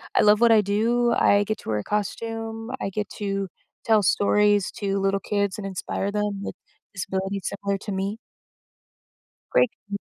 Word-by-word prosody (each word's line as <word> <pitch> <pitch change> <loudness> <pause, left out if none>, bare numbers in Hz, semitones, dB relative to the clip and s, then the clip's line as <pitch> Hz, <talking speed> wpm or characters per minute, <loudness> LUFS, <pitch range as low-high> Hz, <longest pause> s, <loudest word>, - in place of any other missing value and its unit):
I - - +5
love 210 0 +5
what 235 0 +5
I 220 -1 +7
do, 230 +4 +2
I 205 -3 +4
get 215 +1 -2
to - - -9
wear 105 -1 +1
a - - -5
costume, 225 +2 -3
I - - -1
get 205 +1 -3
to 195 -2 -2 0.3
tell 220 -2 +4
stories 205 +1 +3
to 200 -1 -2
little 195 0 +1
kids 200 -1 -1
and 200 -2 -4
inspire 195 +1 -3
them 210 -1 -2
with - - -5 0.4
disabilities 195 0 -3
similar 200 0 -2
to 205 - -6
me 195 +2 -2 1.3
Great, 250 - +4 0.2
m - - -1
205 Hz, 170 wpm, -25 LUFS, 195-215 Hz, 1.3 s, I